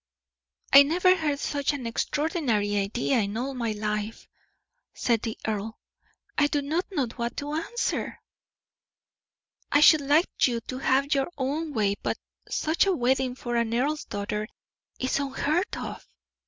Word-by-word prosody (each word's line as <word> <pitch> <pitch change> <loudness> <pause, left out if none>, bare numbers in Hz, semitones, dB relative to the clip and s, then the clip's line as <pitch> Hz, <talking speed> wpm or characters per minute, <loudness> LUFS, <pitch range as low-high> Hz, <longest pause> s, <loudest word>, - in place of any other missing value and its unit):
"I 280 - +12
never 360 +6 +4
heard 305 -5 -1
such 285 0 -1
an 275 -4 -5
extraordinary 230 - 0
idea 215 +6 +1
in 205 0 -2
all 265 +3 -2
my 235 -4 -2
life," 210 +1 -3 0.7
said 230 -3 +1
the 225 -2 -4
earl. 220 +1 -3 0.6
"I 290 - +5
do 290 -1 -1
not 320 +6 -1
know 290 -9 +1
what 235 -1 -3
to 290 +1 -4
answer. 335 +10 -2 1.5
I 290 - +5
should 310 0 +7
like 290 +4 +3
you 240 -2 -1
to 255 +2 -6
have 275 +2 +2
your 275 -1 +1
own 295 +4 -2
way; 210 -6 +1
but - - -1 0.3
such 320 +5 +1
a 385 - +3
wedding 260 -1 +1
for 240 -2 -4
an 230 0 0
earl's 295 +5 0
daughter 210 +1 -3 0.5
is 260 +2 0
unheard 280 +5 -1
of." - - -6
265 Hz, 150 wpm, -26 LUFS, 230-295 Hz, 1.5 s, I